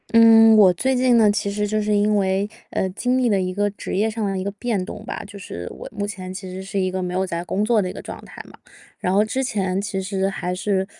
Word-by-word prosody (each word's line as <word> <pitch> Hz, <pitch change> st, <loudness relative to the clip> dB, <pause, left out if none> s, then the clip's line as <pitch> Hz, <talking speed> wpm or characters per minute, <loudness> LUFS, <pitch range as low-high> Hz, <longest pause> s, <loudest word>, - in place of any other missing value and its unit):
嗯， 225 Hz, -1 st, +7 dB
我 190 Hz, -4 st, +7 dB
最 265 Hz, +9 st, 0 dB
近 250 Hz, -1 st, +4 dB
呢， 215 Hz, -2 st, +5 dB
其 205 Hz, -1 st, -1 dB
实 210 Hz, +1 st, -1 dB
就 215 Hz, +1 st, 0 dB
是 210 Hz, 0 st, +1 dB
因 210 Hz, +1 st, +2 dB
为， 195 Hz, +1 st, 0 dB, 0.2 s
呃， 190 Hz, -, -1 dB
经 250 Hz, +7 st, 0 dB
历 250 Hz, -2 st, +2 dB
了 200 Hz, -3 st, +2 dB
一 185 Hz, 0 st, -2 dB
个 205 Hz, +2 st, 0 dB
职 205 Hz, -, -6 dB
业 210 Hz, +3 st, +2 dB
上 220 Hz, -1 st, -3 dB
的 195 Hz, -1 st, -1 dB
一 185 Hz, -, -3 dB
个 200 Hz, -, -3 dB
变 210 Hz, -1 st, -2 dB
动 210 Hz, +3 st, -8 dB
吧， -, -, -5 dB
就 200 Hz, 0 st, -11 dB
是 90 Hz, -, -7 dB
我 -, -, -9 dB
目 205 Hz, -1 st, -3 dB
前 185 Hz, -3 st, -6 dB
其 190 Hz, 0 st, -7 dB
实 190 Hz, -, -6 dB
是 195 Hz, +1 st, -5 dB
一 185 Hz, -1 st, 0 dB
个 185 Hz, 0 st, -2 dB
没 180 Hz, 0 st, -3 dB
有 190 Hz, +1 st, 0 dB
在 170 Hz, -1 st, -4 dB
工 200 Hz, +3 st, -1 dB
作 220 Hz, 0 st, +3 dB
的 185 Hz, -, -2 dB
一 -, -, -6 dB
个 -, -, -8 dB
状 -, -, -8 dB
态 -, -, -10 dB
嘛。 -, -, -16 dB, 0.4 s
然 180 Hz, -, -1 dB
后 205 Hz, +2 st, +4 dB
之 220 Hz, +5 st, -2 dB
前 195 Hz, -6 st, -1 dB
其 200 Hz, -1 st, -3 dB
实 190 Hz, 0 st, -1 dB
还 180 Hz, -2 st, -3 dB
是 190 Hz, +1 st, 0 dB
200 Hz, 300 characters per minute, -22 LUFS, 190-215 Hz, 0.4 s, 嗯